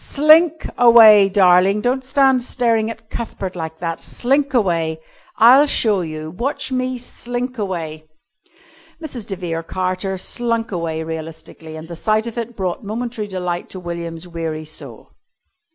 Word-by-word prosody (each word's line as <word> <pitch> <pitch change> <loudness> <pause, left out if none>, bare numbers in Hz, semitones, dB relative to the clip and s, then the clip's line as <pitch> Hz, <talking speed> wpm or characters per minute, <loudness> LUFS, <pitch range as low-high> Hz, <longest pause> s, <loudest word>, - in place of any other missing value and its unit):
Slink 310 +2 +4
away, 220 -4 +8
darling. 190 +1 +4
Don't 255 +3 0
stand 265 -1 +3
staring 230 -3 0
at 225 -1 -10
Cuthbert 195 -5 -5
like 160 -2 -6
that. 165 -1 -3
Slink 275 +3 0
away. 170 -9 0 0.4
I'll 260 +6 +7
show 215 -8 +2
you. 155 -1 -6
Watch 250 - -3
me 255 0 -1
slink 245 0 -5
away." 160 -6 -5 0.9
Mrs. 265 -9 -7
de 195 - -4
Vere 170 -3 -4
Carter 185 +2 -3
slunk 230 +3 -2
away 165 -3 -3
realistically, 160 0 -8
and 160 +1 -9
the 170 - -8
sight 215 +5 0
of 235 - -6
it 235 0 -6
brought 185 +1 -3
momentary 225 +1 -4
delight 180 -3 -4
to 185 - -8
William's 170 -1 -6
weary 165 -2 -5
soul. 155 - -10
200 Hz, 145 wpm, -19 LUFS, 170-240 Hz, 0.9 s, away